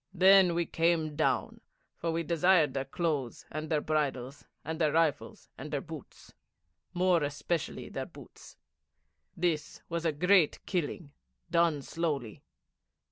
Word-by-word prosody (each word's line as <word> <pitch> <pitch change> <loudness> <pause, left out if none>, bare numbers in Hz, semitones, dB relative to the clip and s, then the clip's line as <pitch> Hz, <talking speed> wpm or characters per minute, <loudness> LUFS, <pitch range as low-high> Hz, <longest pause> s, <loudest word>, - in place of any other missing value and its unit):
Then 190 -1 +6
we 170 0 +1
came 165 -2 +1
down, 155 - 0 0.3
for 165 - -2
we 165 +1 -1
desired 165 -3 +3
their 135 -1 -2
clothes, 135 -6 -2
and 155 +1 -5
their 155 -2 +1
bridles, 145 -3 -2 0.2
and 160 +2 -4
their 155 -2 +3
rifles, 160 -2 0
and - - -6
their - - -1
boots - - -11 0.6
more 180 -1 +2
especially 145 +3 -3
their - - -5
boots. - - -14 0.8
That 165 -3 -2
was 170 -1 -2
a 165 - +2
great 180 +2 +3
killing 170 -3 -3 0.4
done 165 -4 +2
slowly.' 145 -10 -3
160 Hz, 135 wpm, -30 LUFS, 145-170 Hz, 0.8 s, Then